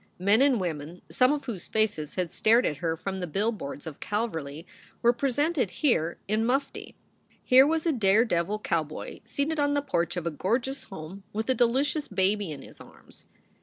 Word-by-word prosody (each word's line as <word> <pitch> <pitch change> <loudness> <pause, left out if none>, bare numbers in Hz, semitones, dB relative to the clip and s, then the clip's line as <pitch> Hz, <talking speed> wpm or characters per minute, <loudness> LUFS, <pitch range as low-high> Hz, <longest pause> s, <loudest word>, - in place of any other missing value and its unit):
Men 200 +6 +3
and 275 -4 +4
women, 165 -1 -5
some 255 +1 +4
of 295 -1 -2
whose 215 -9 -5
faces 205 -9 -1
had 180 -3 -2
stared 230 +3 +3
at 150 - -1
her 165 0 -2
from 190 +2 -4
the 180 - -3
billboards 195 -5 -2
of 160 -3 -8
Calverly, 165 -9 -3 0.4
were 240 +1 +5
presented 275 - 0
here 175 - 0
in 215 +2 +1
mufti. 270 +4 -2 0.5
Here 260 +1 +7
was 320 +1 0
a 330 - +3
dare 220 -3 +4
devil 185 0 0
cowboy 160 -7 -3
seated 300 +2 -2
on 285 0 +2
the 285 - +2
porch 175 - -1
of 175 - -3
a 170 - 0
gorgeous 240 - -2
home, 185 +2 -9
with 220 +4 -1
a - - +4
delicious 265 +5 +1
baby 195 -1 +1
in 140 -2 -7
his - - -12
arms. - - -14
210 Hz, 185 wpm, -27 LUFS, 170-260 Hz, 0.5 s, Here